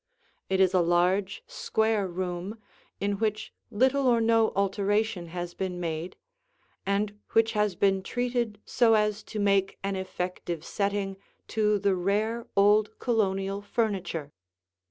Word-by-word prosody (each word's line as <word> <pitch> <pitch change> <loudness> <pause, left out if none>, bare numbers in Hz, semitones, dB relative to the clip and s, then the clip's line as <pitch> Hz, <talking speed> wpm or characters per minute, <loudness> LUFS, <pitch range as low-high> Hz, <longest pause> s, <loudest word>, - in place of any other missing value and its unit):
It 190 0 +1
is 190 -1 +4
a 185 - +4
large, 180 +3 +1
square 220 -2 0
room, 180 +3 -4 0.4
in 200 0 -1
which 215 0 -2 0.2
little 260 +5 +2
or 240 -2 +4
no 225 -1 +3
alteration 200 -1 0
has 175 +1 -5
been 185 -2 -4
made 165 +1 -4 0.7
and 205 +1 0
which 225 0 +4
has 210 -4 +1
been 195 +1 +2
treated 240 0 -2
so 230 -3 +4
as 210 0 +1
to 215 - -5
make 200 -1 +2
an 195 0 -1
effective 180 -3 -4
setting 200 -1 -2 0.3
to 210 -1 +2
the 200 0 +2
rare 210 +6 -1
old 210 +2 +4
Colonial 195 -4 0
furniture. 190 -9 -2
200 Hz, 135 wpm, -28 LUFS, 185-220 Hz, 0.7 s, is